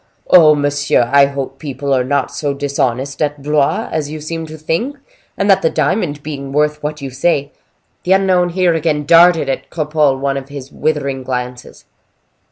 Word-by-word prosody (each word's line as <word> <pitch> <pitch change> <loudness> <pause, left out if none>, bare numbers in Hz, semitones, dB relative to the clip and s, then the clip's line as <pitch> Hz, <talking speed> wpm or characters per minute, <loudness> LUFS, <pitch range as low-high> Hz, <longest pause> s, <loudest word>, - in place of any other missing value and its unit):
"Oh, 155 -4 +7
monsieur, 145 -4 +1
I 140 0 +6
hope 135 -1 -6
people 140 -2 -3
are 130 -1 +2
not 140 +1 -1
so 145 -2 -3
dishonest 140 -1 -2
at 145 -2 -2
Blois 145 -1 +1
as 150 -2 -2
you 155 +1 -6
seem 160 +1 -5
to 155 0 -9
think; 195 - -2 0.4
and 200 - 0
that 195 -2 +4
the 160 - +2
diamond, 150 -1 -1
being 140 -2 -6
worth 150 +1 0
what 150 0 -5
you 135 - -5
say—" 140 +1 0 0.5
The 185 - +2
unknown 185 -2 +2
here 180 0 +1
again 155 -2 -1
darted 165 -1 +5
at 135 - -3
Cropole 150 -3 +1
one 135 0 -1
of 135 0 -7
his 140 -1 -9
withering 140 -4 -2
glances. 125 -1 -6
145 Hz, 175 wpm, -16 LUFS, 140-160 Hz, 0.5 s, Oh